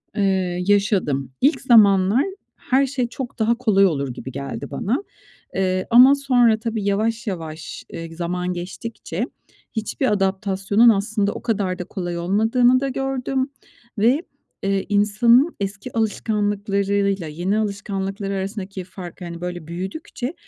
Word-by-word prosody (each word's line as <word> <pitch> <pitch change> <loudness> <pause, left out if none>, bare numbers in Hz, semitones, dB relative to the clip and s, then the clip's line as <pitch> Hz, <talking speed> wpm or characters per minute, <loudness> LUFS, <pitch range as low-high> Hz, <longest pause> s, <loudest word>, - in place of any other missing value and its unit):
Eee, 190 -3 0
yaşadım. 190 - +1
İlk 285 +5 +3
zamanlar 210 -1 +5 0.3
her 270 +1 +1
şey 260 -2 -1
çok 245 +1 -7
daha 225 +2 +3
kolay 200 -5 +4
olur 140 -7 0
gibi 130 +2 -8
geldi 140 -2 -6
bana. 235 - -1 0.5
Eee, 185 -1 0
ama 255 +4 +8
sonra 245 -5 +3
tabii 225 -2 -3
yavaş 220 +4 0
yavaş, 160 -4 -6
eee, 165 0 -7
zaman 180 +1 -2
geçtikçe 185 +6 -5 0.5
hiçbir 225 +3 -1
adaptasyonun 195 +2 +2
aslında 205 -1 +1
o - - -7
kadar 195 -5 -1
da 180 - -2
kolay 175 -2 -5
olmadığını 225 +8 +3
da 275 +1 -1
gördüm 270 0 -2 0.5
ve, 250 +9 +4 0.4
eee, 195 0 0
insanın 230 +8 +4
eski 205 +5 -5
alışkanlıklarıyla 200 -3 0
yeni 175 +7 -1
alışkanlıkları 200 -1 -3
arasındaki 195 -1 -4
farkı, 180 -1 -9
hani, 170 0 -7
böyle 175 -3 -5
büyüdükçe 195 - -5
200 Hz, 130 wpm, -22 LUFS, 185-230 Hz, 0.5 s, ama